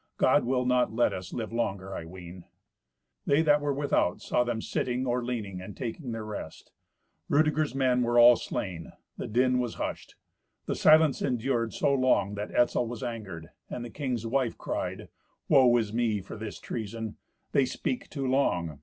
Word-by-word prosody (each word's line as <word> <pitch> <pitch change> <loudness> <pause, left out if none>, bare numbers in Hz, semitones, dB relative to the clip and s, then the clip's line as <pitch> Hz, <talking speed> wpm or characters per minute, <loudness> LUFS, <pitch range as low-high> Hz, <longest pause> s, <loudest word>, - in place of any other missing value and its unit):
God - - +4
will 125 0 +1
not 125 -2 +2
let 120 +2 +2
us 90 -1 -6
live 115 -1 -5
longer, 100 -5 -2
I 80 - -6
ween." 90 0 -10 0.8
They 145 +3 +4
that 150 -2 +4
were 145 0 0
without 140 -10 +1
saw 125 - +1
them 120 -2 -2
sitting, 125 +3 -2
or 125 0 0
leaning 105 -7 -4
and 95 - -9
taking 125 +1 -5
their 115 -1 -5
rest. 105 -7 -8 0.6
Rudeger's 155 -1 +2
men 130 -2 +2
were 120 0 +1
all 120 0 +9
slain; 90 -7 -5 0.2
the - - -4
din 125 +3 +2
was 120 -2 -2
hushed. - - -5 0.5
The - - -1
silence 155 -2 +5
endured 120 -3 -1
so 140 - +2
long 130 -7 +2
that 105 +1 -4
Etzel 120 0 +2
was 120 +1 -6
angered, 95 -9 -6 0.2
and 120 - -5
the 120 - -8
king's 125 -6 -3
wife 125 0 0
cried, - - -4 0.4
"Woe 125 -3 +6
is 110 -3 -1
me 115 -3 +1
for 95 - -9
this 110 -1 -7
treason. 110 -1 -5 0.3
They 140 -3 +3
speak 245 - -3
too 140 -3 -4
long. 90 - 0
120 Hz, 175 wpm, -28 LUFS, 105-130 Hz, 0.8 s, all